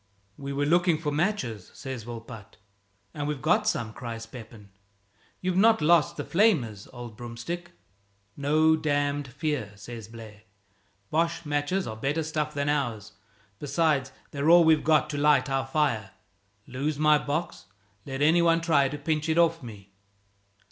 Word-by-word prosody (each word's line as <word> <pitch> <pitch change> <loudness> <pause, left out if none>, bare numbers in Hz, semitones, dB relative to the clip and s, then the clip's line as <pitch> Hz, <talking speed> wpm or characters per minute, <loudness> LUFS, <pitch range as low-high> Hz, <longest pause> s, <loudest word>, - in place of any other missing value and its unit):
"We 140 +3 -6
were 140 +1 -1
looking 175 +1 +3
for 150 -2 -3
matches," 150 - -2
says 130 -6 -7
Volpatte. 115 -2 -10 0.6
"And 145 -1 -4
we've 150 -2 -3
got 210 - +2
some!" 115 - -1
cries 115 -2 -6
Pepin. 110 -4 -12 0.7
"You've 185 -1 -1
not 225 +3 +5
lost 170 +1 +3
the - - -3
flamers, 155 - +1
old 120 -3 -9
broomstick?" 120 +10 -7 0.6
"No 155 +3 +3
damned 145 -2 -1
fear!" 130 -5 -3
says 115 +1 -9
Blaire; 110 -2 -12 0.7
"Boche 165 +1 0
matches 145 +6 -1
are 110 - -5
better 140 +8 -1
stuff 150 -1 -2
than 140 0 -1
ours. 120 -8 -2 0.5
Besides, 145 -2 0 0.2
they're 145 +2 0
all 170 0 +8
we've 160 -1 +4
got 155 -1 +3
to 145 - -3
light 145 -2 +3
our 135 0 0
fire! 135 -8 0 0.6
Lose 140 +4 -3
my 150 0 +4
box? 145 - -4 0.4
Let 135 +2 -3
any 165 +3 +5
one 165 -1 +4
try 145 -5 +3
to 150 - -5
pinch 155 +1 -1
it 160 - +1
off 165 -1 +3
me!" 100 -5 -11
145 Hz, 155 wpm, -27 LUFS, 120-160 Hz, 0.7 s, all